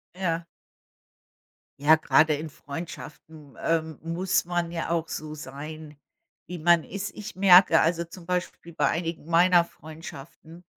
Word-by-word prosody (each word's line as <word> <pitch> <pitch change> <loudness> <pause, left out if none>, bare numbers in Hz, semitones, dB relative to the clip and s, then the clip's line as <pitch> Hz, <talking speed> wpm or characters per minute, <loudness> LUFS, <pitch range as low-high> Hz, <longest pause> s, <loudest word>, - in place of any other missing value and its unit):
Ja. 170 -3 -2 1.3
Ja, 150 +3 +6
gerade 155 -1 +3
in 155 +2 -6
Freundschaften, 150 -1 -10
ähm, 160 -2 0
muss 175 +3 0
man 175 -1 -2
ja 170 -1 -4
auch 165 -1 -1
so 155 0 -5
sein, 150 +1 -9 0.5
wie 175 -1 -6
man 170 0 +4
ist. 200 0 -5
Ich 210 -1 -8
merke, 185 -3 +7
also, 170 +1 +1
zum 170 +1 -13
Beispiel 180 -2 -4
bei 145 -3 +1
einigen 165 -1 -3
meiner 175 +1 +5
Freundschaften. 160 +1 -12
165 Hz, 135 wpm, -26 LUFS, 155-175 Hz, 1.3 s, merke